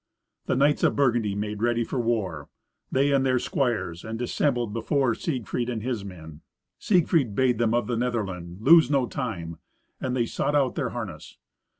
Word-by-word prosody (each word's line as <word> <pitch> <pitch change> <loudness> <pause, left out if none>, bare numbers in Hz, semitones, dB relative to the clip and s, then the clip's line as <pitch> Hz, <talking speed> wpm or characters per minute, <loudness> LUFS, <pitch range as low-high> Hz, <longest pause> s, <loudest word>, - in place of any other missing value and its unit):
The - - +1
knights 145 +3 +3
of - - +3
Burgundy 120 -7 +1
made 105 0 -4
ready 120 0 +2
for 125 - -3
war, 105 -11 -2 0.4
they 140 +2 +2
and 135 -1 +3
their 130 -1 +2
squires, 110 -10 -1
and 110 +1 -5
dissembled 120 -2 0
before 120 +2 +1
Siegfried 125 -4 -3
and 115 -3 -3
his 120 -5 -2
men. 80 -5 -10 0.4
Siegfried 160 - +2
bade 125 -2 +2
them 115 -1 +2
of 120 - +1
the 120 - -2
Netherland 95 -8 -3
lose 160 +2 +7
no 140 -3 +2
time, 95 -12 -5 0.4
and 130 -1 -2
they 120 -2 +1
sought 145 +5 -1
out 135 -3 +2
their 140 -6 -2
harness. 105 -11 -7
120 Hz, 175 wpm, -26 LUFS, 105-130 Hz, 0.4 s, lose